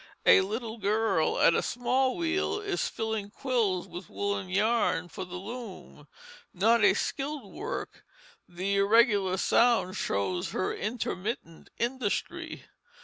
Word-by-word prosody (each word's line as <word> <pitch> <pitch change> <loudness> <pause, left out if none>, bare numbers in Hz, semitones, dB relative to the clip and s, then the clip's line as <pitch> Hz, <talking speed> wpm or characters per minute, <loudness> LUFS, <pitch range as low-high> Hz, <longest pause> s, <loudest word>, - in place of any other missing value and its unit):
A - - +8
little 220 +3 -4
girl 210 -5 +1
at - - +6
a - - +2
small 255 +2 0
wheel 345 +4 0
is 405 -3 -1
filling 220 -2 -3
quills 225 -7 0
with 175 +1 -9
woollen 200 -2 -2
yarn 200 -3 +1
for 185 - -6
the 180 0 -9
loom, 215 +2 -8 0.5
not 220 +4 +4
a 195 -1 +6
skilled 275 -6 -3
work; 485 +3 -5 0.5
the 190 +3 -1
irregular 200 -2 +4
sound 230 -2 +3
shows 95 - -1
her 185 - -1
intermittent 210 -5 -4
industry. 240 -3 -3
210 Hz, 125 wpm, -29 LUFS, 190-240 Hz, 0.5 s, A